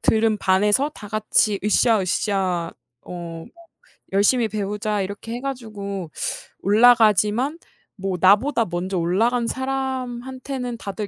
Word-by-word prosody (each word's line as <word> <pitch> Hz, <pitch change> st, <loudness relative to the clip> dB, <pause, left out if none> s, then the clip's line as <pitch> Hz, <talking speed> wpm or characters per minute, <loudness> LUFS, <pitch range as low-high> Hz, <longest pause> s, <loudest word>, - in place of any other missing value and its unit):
들은 220 Hz, -1 st, +2 dB
반에서 205 Hz, +10 st, +2 dB
다 210 Hz, -, -10 dB
같이 215 Hz, -1 st, +1 dB
으쌰으쌰 195 Hz, -5 st, +1 dB, 0.3 s
어 -, -, -14 dB
뭐 170 Hz, -2 st, -7 dB, 0.7 s
열심히 220 Hz, +4 st, +3 dB
배우자 210 Hz, 0 st, -2 dB
이렇게 200 Hz, +4 st, -6 dB
해 245 Hz, -, -5 dB
가지고 205 Hz, -, -5 dB, 0.5 s
올라가지만 220 Hz, -, +4 dB, 0.4 s
뭐 195 Hz, -2 st, -3 dB
나보다 225 Hz, -, +4 dB
먼저 180 Hz, +2 st, -3 dB
올라간 225 Hz, +8 st, +1 dB
사람한테는 260 Hz, -1 st, -4 dB
다들 205 Hz, -1 st, -5 dB
210 Hz, 260 characters per minute, -22 LUFS, 195-245 Hz, 0.7 s, 올라가지만